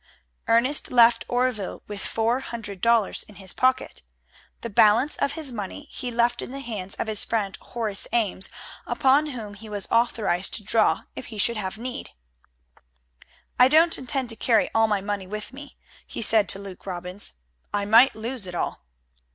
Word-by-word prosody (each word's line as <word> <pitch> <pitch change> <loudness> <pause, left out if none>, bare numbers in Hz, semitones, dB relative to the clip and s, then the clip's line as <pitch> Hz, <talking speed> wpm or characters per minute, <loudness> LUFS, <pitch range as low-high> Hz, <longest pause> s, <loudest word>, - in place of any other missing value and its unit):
Ernest 235 +6 +3
left 240 -1 +5
Oreville 245 -5 -1
with 205 -1 -6
four 230 +3 0
hundred 215 -7 -7
dollars 230 -3 +2
in 210 - -7
his 190 -2 0
pocket. 255 0 0 0.6
The 230 - -5
balance 215 +8 +4
of 280 - 0
his 310 -5 -1
money 230 +6 -6
he 250 - -4
left, 235 0 +1
in - - -6
the 275 +2 -7
hands 215 -8 -5
of - - -3
his 215 -2 +2
friend 205 -4 -1
Horace 220 -5 -2
Ames, 210 -5 +1 0.4
upon 275 +3 +3
whom 225 -7 -6
he 215 +2 -12
was 205 -2 -1
authorized 220 -6 +1
to 215 - -4
draw 215 +2 +2
if - - -7
he 220 - -9
should 235 +3 +2
have 195 0 -4
need. 245 +2 -6 1.5
"I 250 - +8
don't 320 +4 +4
intend 260 -1 -2
to 225 - +3
carry 225 -1 +2
all 225 0 +4
my 205 -2 0
money 200 -1 -4
with 210 +4 -6
me," 285 +1 -11 0.3
he - - -3
said 215 -4 +4
to - - 0
Luke 195 -1 -10
Robbins. 180 +2 -3 0.4
"I 205 -1 -1
might 230 +6 +6
lose 225 -1 -3
it 180 - -6
all." - - -3
225 Hz, 175 wpm, -24 LUFS, 205-245 Hz, 1.5 s, I